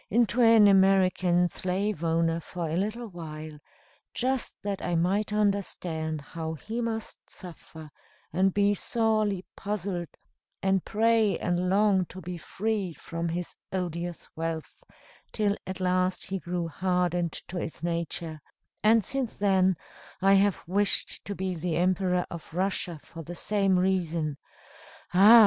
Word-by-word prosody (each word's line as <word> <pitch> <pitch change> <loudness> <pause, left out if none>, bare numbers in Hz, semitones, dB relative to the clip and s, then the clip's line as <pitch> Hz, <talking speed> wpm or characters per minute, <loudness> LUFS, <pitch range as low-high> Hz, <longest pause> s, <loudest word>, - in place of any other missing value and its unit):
into 235 0 +3
an 225 -3 +7
American 190 -2 +4
slave 185 +1 -2
owner 165 0 +2
for 170 0 -5
a 155 - -2
little 215 +6 -2
while, 155 -4 -8 0.6
just 260 0 -1
that 200 -1 -2
I 175 - -1
might 195 +6 +1
understand 180 -7 -1
how 160 +2 -5
he 225 +9 -4
must 225 -1 -4
suffer, 160 -3 -11 0.4
and 190 +2 +3
be 200 +1 +3
sorely 215 -3 0
puzzled, 195 -4 -3 0.6
and 190 -1 +2
pray 220 -1 +3
and 180 +1 0
long 195 -1 +4
to 185 - -10
be 180 -1 -6
freed 195 -3 -2
from 170 0 -3
his 175 +1 -4 0.2
odious 175 -2 -3
wealth, 165 -1 -3 0.6
till 205 -2 +1
at 185 -1 -5
last 185 0 +1
he 195 - -1
grew 175 -1 -3
hardened 175 0 0 0.2
to 180 - -3
its 160 -3 -6
nature; 170 -2 -3 0.4
and 220 0 +5
since 265 -1 -3
then, 190 -3 +3 0.4
I 195 +1 +5
have 195 -2 +3
wished 200 +3 +1
to 200 - -4
be 190 -1 -2
the 170 0 -2
Emperor 180 0 +2
of 170 -2 -8
Russia, 185 -3 -1
for 165 - -9
the 175 +3 -7
same 195 -1 +2
reason. 170 -5 0 0.8
Ah! 210 +6 +9
185 Hz, 140 wpm, -28 LUFS, 170-205 Hz, 0.8 s, Ah